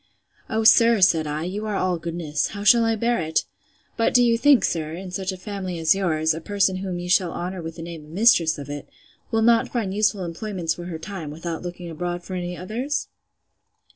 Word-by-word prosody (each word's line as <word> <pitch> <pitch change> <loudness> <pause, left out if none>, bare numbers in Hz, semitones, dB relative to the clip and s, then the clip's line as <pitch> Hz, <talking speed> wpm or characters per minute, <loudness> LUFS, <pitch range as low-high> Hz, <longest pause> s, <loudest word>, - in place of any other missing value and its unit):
O, 220 0 0
sir, 230 0 +6
said 170 -5 +4
I, 150 +1 -3
you 200 +5 -4
are 210 - -2
all 185 -3 0
goodness! 165 -4 -2
How 205 - -5
shall 235 +2 +6
I 225 0 +2
bear 235 +2 0
it?—But 160 +8 -3
do 245 - +7
you 235 -1 +4
think, 280 +2 +5
sir, 160 -2 -2
in 180 +2 -7
such 190 +1 -3
a 185 - -7
family 190 -2 -5
as 160 -1 +4
yours, 160 -5 +1
a 160 - -6
person 195 +1 +1
whom 185 -2 -4
you 175 0 -5
shall 180 -1 +3
honour 180 +1 -4
with 165 0 -7
the 165 - -8
name 165 -2 -8
of - - -16
mistress 170 -4 +4
of 140 -1 -7
it, 145 0 -7 0.4
will 225 0 +1
not 230 0 +4
find 215 -6 -2
useful 205 -2 +1
employments 170 -1 -3
for 175 - -8
her 170 -2 -5
time, 165 -2 -7
without 165 +2 -5
looking 175 0 -7
abroad 175 +2 -4
for 190 - -8
any 180 -1 -4
others? 240 +11 -3
180 Hz, 215 wpm, -23 LUFS, 165-210 Hz, 0.4 s, do